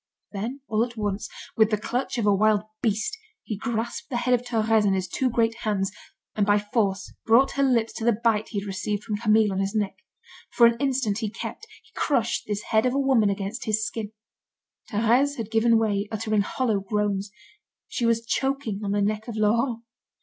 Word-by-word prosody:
Then, 230 Hz, +7 st, -4 dB
all 220 Hz, 0 st, +2 dB
at 240 Hz, -1 st, -6 dB
once, 205 Hz, -1 st, -2 dB, 0.3 s
with 220 Hz, -2 st, +4 dB
the 215 Hz, -, +1 dB
clutch 245 Hz, +5 st, -2 dB
of 230 Hz, -, 0 dB
a 205 Hz, -, +5 dB
wild 210 Hz, +1 st, +3 dB, 0.2 s
beast, 220 Hz, -, 0 dB, 0.3 s
he 215 Hz, -, -4 dB
grasped 230 Hz, +3 st, -3 dB
the 245 Hz, -, -1 dB
head 250 Hz, +1 st, +1 dB
of 245 Hz, -, +3 dB
Thérèse 225 Hz, -3 st, +2 dB
in 195 Hz, -2 st, +2 dB
his 185 Hz, -1 st, -2 dB
two 255 Hz, +7 st, 0 dB
great 230 Hz, -1 st, +1 dB
hands, 200 Hz, -4 st, -1 dB, 0.4 s
and 210 Hz, -, +1 dB
by 205 Hz, 0 st, +4 dB
force 205 Hz, -1 st, -1 dB
brought 235 Hz, +4 st, +5 dB
her 280 Hz, -, -1 dB
lips 240 Hz, -5 st, +2 dB
to -, -, -6 dB
the 230 Hz, -2 st, +2 dB
bite 220 Hz, -2 st, +2 dB
he 200 Hz, -, -2 dB
had -, -, -8 dB
received 205 Hz, +1 st, -3 dB
from 215 Hz, -2 st, -3 dB
Camille 215 Hz, -1 st, +3 dB
on 190 Hz, -, -2 dB
his 195 Hz, +2 st, -1 dB
neck. 205 Hz, -2 st, -1 dB, 0.6 s
For 235 Hz, -, +6 dB
an 235 Hz, 0 st, +5 dB
instant 260 Hz, -7 st, 0 dB
he 220 Hz, -2 st, -2 dB
kept, 445 Hz, -, -7 dB, 0.2 s
he -, -, -25 dB
crushed, 235 Hz, -6 st, 0 dB
this 210 Hz, 0 st, -2 dB
head 220 Hz, +2 st, +4 dB
of 250 Hz, -, -1 dB
a -, -, +2 dB
woman 260 Hz, -7 st, +3 dB
against 200 Hz, +5 st, -3 dB
his 215 Hz, -1 st, +1 dB
skin. 215 Hz, -2 st, -5 dB, 0.8 s
Thérèse 240 Hz, +7 st, +2 dB
had 225 Hz, -2 st, -5 dB
given 225 Hz, +1 st, +4 dB
way, 205 Hz, -2 st, 0 dB
uttering 215 Hz, -1 st, 0 dB
hollow 220 Hz, 0 st, 0 dB
groans. 200 Hz, 0 st, -1 dB, 0.6 s
She 235 Hz, -, -1 dB
was 230 Hz, 0 st, +1 dB
choking 265 Hz, -5 st, -1 dB
on 200 Hz, -1 st, -1 dB
the 205 Hz, 0 st, +1 dB
neck 215 Hz, +2 st, -1 dB
of 235 Hz, -, -5 dB
Laurent. 230 Hz, +2 st, +1 dB
220 Hz, 205 wpm, -25 LUFS, 205-235 Hz, 0.8 s, For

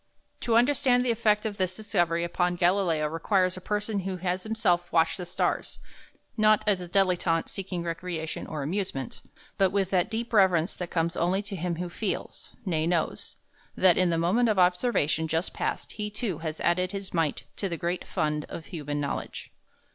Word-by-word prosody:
To 230 Hz, -, +1 dB
understand 250 Hz, 0 st, +4 dB
the 245 Hz, -, +3 dB
effect 215 Hz, -1 st, +2 dB
of 210 Hz, -2 st, -3 dB
this 185 Hz, -2 st, -1 dB
discovery 175 Hz, -6 st, 0 dB
upon 175 Hz, +1 st, 0 dB
Galileo 175 Hz, -3 st, +2 dB
requires 185 Hz, +4 st, +1 dB
a 185 Hz, -, -8 dB
person 210 Hz, +1 st, -1 dB
who 190 Hz, 0 st, -3 dB
has 180 Hz, +1 st, -1 dB
himself 200 Hz, -5 st, 0 dB
watched 165 Hz, +1 st, +3 dB
the 180 Hz, -, -5 dB
stars, -, -, -1 dB, 0.6 s
not, 215 Hz, -1 st, +4 dB
as 200 Hz, -4 st, +2 dB
a 180 Hz, -, -6 dB
dilettante, 180 Hz, -3 st, +2 dB
seeking 185 Hz, -3 st, -4 dB
recreation 165 Hz, -1 st, -4 dB
or 150 Hz, -3 st, -4 dB
amusement, 155 Hz, -, -3 dB, 0.4 s
but 195 Hz, -1 st, +5 dB
with 195 Hz, -1 st, 0 dB
that 180 Hz, -2 st, +2 dB
deep 230 Hz, +1 st, -4 dB
reverence 190 Hz, -4 st, +4 dB
that 180 Hz, -2 st, -5 dB
comes 170 Hz, 0 st, 0 dB
only 185 Hz, +4 st, +1 dB
to 200 Hz, 0 st, -5 dB
him 175 Hz, -1 st, -2 dB
who 175 Hz, +2 st, -3 dB
feels 195 Hz, +3 st, -4 dB, 0.2 s
nay, 160 Hz, -4 st, 0 dB
knows 170 Hz, -2 st, -1 dB, 0.4 s
that 185 Hz, -2 st, +5 dB
in 185 Hz, -1 st, +3 dB
the 165 Hz, -, +1 dB
moment 200 Hz, +9 st, +2 dB
of 210 Hz, -, +1 dB
observation 180 Hz, -, +2 dB
just 165 Hz, +3 st, -1 dB
passed -, -, -3 dB
he 210 Hz, 0 st, -4 dB
too 210 Hz, -5 st, -3 dB
has 160 Hz, -1 st, -4 dB
added 180 Hz, +1 st, +2 dB
his 195 Hz, -1 st, -5 dB
mite 165 Hz, -4 st, 0 dB
to 195 Hz, -, -1 dB
the 170 Hz, -, -3 dB
great 175 Hz, +1 st, -3 dB
fund 150 Hz, -3 st, -1 dB
of 160 Hz, -, -7 dB
human 145 Hz, -4 st, -4 dB
knowledge. 140 Hz, -1 st, -4 dB
180 Hz, 185 wpm, -27 LUFS, 170-200 Hz, 0.6 s, but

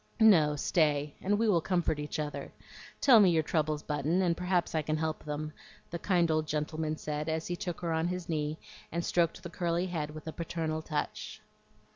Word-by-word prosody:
"No, 165 Hz, -10 st, +6 dB
stay, 150 Hz, -1 st, +1 dB
and 205 Hz, +2 st, +1 dB
we 225 Hz, +1 st, +2 dB
will 180 Hz, -6 st, +4 dB
comfort 175 Hz, -4 st, 0 dB
each 150 Hz, 0 st, -4 dB
other. 150 Hz, -1 st, -4 dB, 0.5 s
Tell 250 Hz, -5 st, +8 dB
me 195 Hz, -3 st, +7 dB
your 160 Hz, -2 st, +3 dB
troubles, 155 Hz, -1 st, 0 dB
Button, 150 Hz, +5 st, 0 dB
and 170 Hz, -2 st, +2 dB
perhaps 180 Hz, 0 st, 0 dB
I 160 Hz, -, +2 dB
can 155 Hz, +1 st, -1 dB
help 155 Hz, 0 st, -2 dB
them," 150 Hz, 0 st, -4 dB, 0.4 s
the 170 Hz, -, -3 dB
kind 175 Hz, -4 st, +2 dB
old 155 Hz, 0 st, +1 dB
gentleman 155 Hz, +1 st, -2 dB
said 150 Hz, +1 st, -3 dB
as 160 Hz, 0 st, -1 dB
he 175 Hz, -, -2 dB
took 175 Hz, -1 st, -5 dB
her 170 Hz, -2 st, -1 dB
on 160 Hz, +1 st, +1 dB
his 180 Hz, -1 st, -3 dB
knee 155 Hz, -1 st, -1 dB, 0.3 s
and 170 Hz, +1 st, -2 dB
stroked 170 Hz, -2 st, +1 dB
the 170 Hz, -, -6 dB
curly 175 Hz, 0 st, 0 dB
head 160 Hz, -5 st, -3 dB
with 155 Hz, 0 st, -9 dB
a 160 Hz, -, -5 dB
paternal 160 Hz, -2 st, -3 dB
touch. 155 Hz, -2 st, -4 dB
160 Hz, 200 wpm, -31 LUFS, 155-175 Hz, 0.5 s, Tell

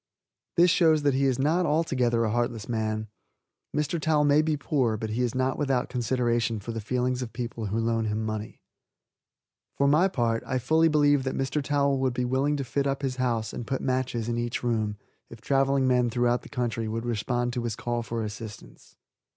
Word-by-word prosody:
This 175 Hz, +1 st, +6 dB
shows 160 Hz, -4 st, +4 dB
that 140 Hz, -1 st, +3 dB
he 135 Hz, +1 st, +2 dB
is 130 Hz, -2 st, +2 dB
not 160 Hz, +6 st, +2 dB
altogether 130 Hz, -7 st, +1 dB
a 110 Hz, -, 0 dB
heartless 120 Hz, -2 st, -1 dB
man. 110 Hz, -2 st, -2 dB, 0.6 s
Mr. 150 Hz, +2 st, -1 dB
Towel 150 Hz, -1 st, +2 dB
may 145 Hz, +1 st, +5 dB
be 155 Hz, -1 st, 0 dB
poor, 130 Hz, -6 st, 0 dB
but 110 Hz, 0 st, -4 dB
he 115 Hz, +3 st, -1 dB
is 120 Hz, -1 st, -1 dB
not 130 Hz, +1 st, 0 dB
without 135 Hz, -4 st, 0 dB
consideration 120 Hz, -2 st, 0 dB
for 110 Hz, +4 st, -6 dB
the 115 Hz, -1 st, -4 dB
feelings 125 Hz, +3 st, -1 dB
of 120 Hz, -3 st, -5 dB
people 120 Hz, -3 st, -4 dB
who 105 Hz, +3 st, -2 dB
loan 115 Hz, 0 st, 0 dB
him 110 Hz, +1 st, -1 dB
money. 110 Hz, 0 st, -5 dB, 1.1 s
For 140 Hz, -, +3 dB
my 155 Hz, +6 st, +5 dB
own -, -, +2 dB
part 115 Hz, -7 st, 0 dB
I 130 Hz, -, 0 dB
fully 160 Hz, +6 st, +3 dB
believe 145 Hz, -2 st, +4 dB
that 130 Hz, 0 st, -3 dB
Mr. 135 Hz, +3 st, -1 dB
Towel 140 Hz, -1 st, +1 dB
would 130 Hz, -2 st, 0 dB
be 125 Hz, -1 st, 0 dB
willing 135 Hz, +4 st, +1 dB
to 140 Hz, -, -2 dB
fit 140 Hz, +2 st, -1 dB
up 135 Hz, +1 st, -2 dB
his 130 Hz, -1 st, -2 dB
house 115 Hz, -4 st, -1 dB
and 120 Hz, -, -6 dB
put 135 Hz, -, -1 dB
matches 130 Hz, -3 st, -1 dB
in 120 Hz, 0 st, -1 dB
each 120 Hz, +1 st, -3 dB
room 110 Hz, -3 st, 0 dB, 0.3 s
if 115 Hz, -, -11 dB
traveling 135 Hz, +2 st, +2 dB
men 125 Hz, -1 st, +3 dB
throughout 120 Hz, +1 st, +1 dB
the -, -, -13 dB
country 120 Hz, -4 st, -2 dB
would 115 Hz, +2 st, -3 dB
respond 120 Hz, +1 st, -1 dB
to 125 Hz, -, -2 dB
this 115 Hz, -2 st, -3 dB
call 120 Hz, -1 st, -2 dB
for 115 Hz, 0 st, -3 dB
assistance. 105 Hz, -, -9 dB
125 Hz, 210 wpm, -27 LUFS, 115-140 Hz, 1.1 s, This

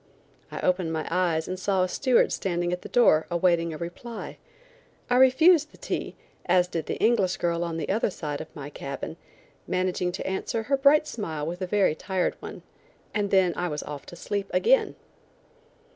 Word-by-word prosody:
I -, -, -5 dB
opened 180 Hz, -2 st, +1 dB
my 160 Hz, -1 st, -3 dB
eyes 170 Hz, -3 st, +1 dB
and 185 Hz, 0 st, -4 dB
saw 190 Hz, -1 st, +1 dB
a -, -, +1 dB
steward 255 Hz, +6 st, +2 dB
standing 175 Hz, -2 st, -1 dB
at 180 Hz, -, -4 dB
the -, -, -9 dB
door 160 Hz, -10 st, +4 dB
awaiting 170 Hz, -1 st, +2 dB
a 155 Hz, -, -6 dB
reply. 175 Hz, +8 st, -7 dB, 0.7 s
I 245 Hz, -, +4 dB
refused 305 Hz, +5 st, +5 dB
the -, -, -17 dB
tea, -, -, -4 dB, 0.3 s
as 180 Hz, 0 st, +4 dB
did 165 Hz, -3 st, -4 dB
the -, -, -2 dB
English 210 Hz, -5 st, +2 dB
girl 170 Hz, 0 st, 0 dB
on 165 Hz, -1 st, -3 dB
the 155 Hz, -, -3 dB
other 215 Hz, +3 st, +1 dB
side 150 Hz, -6 st, -5 dB
of 155 Hz, -, -8 dB
my 145 Hz, 0 st, -7 dB
cabin, 140 Hz, +3 st, -6 dB, 0.5 s
managing 185 Hz, -1 st, 0 dB
to 190 Hz, -, -5 dB
answer 190 Hz, +4 st, -2 dB
her 275 Hz, +5 st, +1 dB
bright 280 Hz, +3 st, +5 dB
smile 160 Hz, -, -4 dB
with 175 Hz, +3 st, -5 dB
a 185 Hz, -, -2 dB
very 195 Hz, -4 st, +2 dB
tired 185 Hz, +3 st, -1 dB
one, -, -, -9 dB, 0.5 s
and 205 Hz, -1 st, 0 dB
then 190 Hz, -3 st, +3 dB
I 180 Hz, -, -1 dB
was 150 Hz, -3 st, -4 dB
off 145 Hz, -2 st, -8 dB
to -, -, -10 dB
sleep 200 Hz, +3 st, -3 dB
again. 480 Hz, -1 st, +3 dB
180 Hz, 190 wpm, -26 LUFS, 165-210 Hz, 0.7 s, refused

